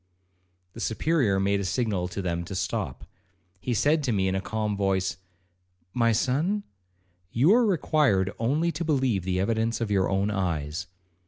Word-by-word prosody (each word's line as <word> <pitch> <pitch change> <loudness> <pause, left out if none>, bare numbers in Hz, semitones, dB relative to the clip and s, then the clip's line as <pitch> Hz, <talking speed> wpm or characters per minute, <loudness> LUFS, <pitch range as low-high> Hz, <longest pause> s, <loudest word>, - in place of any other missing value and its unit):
The - - -10
Superior 115 -3 +1
made 100 +1 +1
a - - -2
signal 100 -3 -1
to 95 +2 -5
them 85 -1 -2
to 100 +2 -6
stop. 65 -7 -3 0.5
He 120 +4 -2
said 150 +8 +3
to 130 - 0
me 95 -3 +1
in 95 - 0
a 95 - -1
calm 105 0 -2
voice, 95 -2 0 0.8
'My 115 -1 +3
son, 155 - +1 0.7
you 135 - +4
are 240 -1 +4
required 145 - +2
only 150 +9 +1
to 165 +1 -4
believe 130 - +1
the 95 0 0
evidence 115 +3 0
of 115 -3 -2
your 95 -2 +2
own 100 +2 +1
eyes. 85 -5 -2
105 Hz, 165 wpm, -26 LUFS, 95-135 Hz, 0.8 s, you